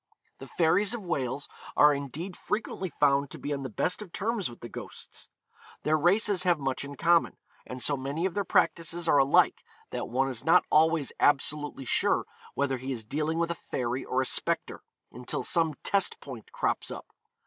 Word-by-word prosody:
The -, -, -9 dB
fairies 185 Hz, +7 st, +2 dB
of 225 Hz, -, -7 dB
Wales 140 Hz, -5 st, -2 dB, 0.3 s
are 150 Hz, 0 st, +7 dB
indeed 145 Hz, +7 st, -5 dB
frequently 195 Hz, -3 st, -3 dB
found 140 Hz, -2 st, +2 dB
to -, -, -9 dB
be 145 Hz, -, -3 dB
on 140 Hz, -, -3 dB
the 130 Hz, -, -4 dB
best 180 Hz, -, -1 dB
of 200 Hz, -5 st, -9 dB
terms 210 Hz, -, -2 dB
with 120 Hz, -, -13 dB
the 120 Hz, -, -6 dB
ghosts. -, -, -9 dB, 0.6 s
Their 155 Hz, -, +3 dB
races 190 Hz, +5 st, +3 dB
have 180 Hz, -3 st, +3 dB
much 135 Hz, -2 st, -2 dB
in 140 Hz, 0 st, -8 dB
common, 170 Hz, +4 st, +3 dB, 0.3 s
and 125 Hz, 0 st, -3 dB
so 145 Hz, -, +3 dB
many 140 Hz, +6 st, -3 dB
of 190 Hz, -, -1 dB
their 200 Hz, -, 0 dB
practices 170 Hz, -1 st, +1 dB
are 145 Hz, -, +5 dB
alike 135 Hz, +1 st, +4 dB, 0.3 s
that -, -, -4 dB
one 130 Hz, +3 st, +1 dB
is 125 Hz, -4 st, -4 dB
not 170 Hz, +3 st, +5 dB
always 160 Hz, -2 st, +3 dB
absolutely 145 Hz, -1 st, +1 dB
sure -, -, +2 dB, 0.3 s
whether 135 Hz, -1 st, 0 dB
he 130 Hz, +2 st, -5 dB
is 115 Hz, -4 st, -3 dB
dealing 155 Hz, +7 st, -1 dB
with 170 Hz, 0 st, 0 dB
a 170 Hz, -, -6 dB
fairy 125 Hz, +1 st, -2 dB
or 130 Hz, +1 st, 0 dB
a -, -, -4 dB
spectre, -, -, -1 dB, 0.3 s
until 125 Hz, +1 st, -4 dB
some 165 Hz, -3 st, +1 dB
test 200 Hz, -2 st, +1 dB
point 125 Hz, -6 st, -10 dB
crops -, -, -1 dB
up. -, -, -7 dB
150 Hz, 190 wpm, -28 LUFS, 135-175 Hz, 0.6 s, are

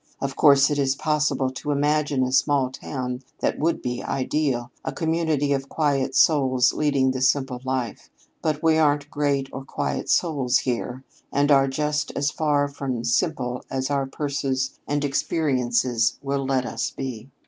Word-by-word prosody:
Of 135 Hz, -1 st, -3 dB
course 140 Hz, -1 st, +5 dB
it 145 Hz, -, 0 dB
is 135 Hz, -1 st, +2 dB
possible 150 Hz, -3 st, 0 dB
to 130 Hz, +3 st, -6 dB
imagine 145 Hz, -1 st, +1 dB
a 130 Hz, -, -1 dB
small 135 Hz, -1 st, +2 dB
town 125 Hz, -2 st, -5 dB, 0.2 s
that -, -, -1 dB
would 165 Hz, +3 st, 0 dB
be 125 Hz, -1 st, -3 dB
ideal 130 Hz, -3 st, -1 dB
a -, -, -3 dB
community 160 Hz, -4 st, 0 dB
of 135 Hz, 0 st, -3 dB
quiet 140 Hz, -4 st, 0 dB
souls 130 Hz, -4 st, +4 dB
leading 140 Hz, -3 st, +2 dB
the 130 Hz, 0 st, -3 dB
simple 130 Hz, -1 st, +1 dB
life. 130 Hz, -4 st, -3 dB, 0.3 s
But 155 Hz, -1 st, -1 dB
we 160 Hz, -1 st, +4 dB
aren't 145 Hz, -1 st, +2 dB
great 140 Hz, -2 st, 0 dB
or 135 Hz, -, -6 dB
quiet -, -, -3 dB
souls 140 Hz, -7 st, +2 dB
here, 125 Hz, +1 st, -3 dB, 0.3 s
and 145 Hz, +1 st, +2 dB
are 135 Hz, -1 st, +5 dB
just 150 Hz, +2 st, -1 dB
as 140 Hz, +1 st, 0 dB
far 145 Hz, -2 st, +1 dB
from 135 Hz, -4 st, -4 dB
simple 125 Hz, 0 st, 0 dB
as 130 Hz, +1 st, -2 dB
our 140 Hz, -1 st, 0 dB
purses 135 Hz, -2 st, -2 dB
and 145 Hz, 0 st, 0 dB
experience 125 Hz, -5 st, +1 dB
will 135 Hz, -1 st, -1 dB
let 130 Hz, -2 st, +1 dB
us -, -, -2 dB
be. 130 Hz, -2 st, -6 dB
135 Hz, 160 wpm, -24 LUFS, 130-145 Hz, 0.3 s, course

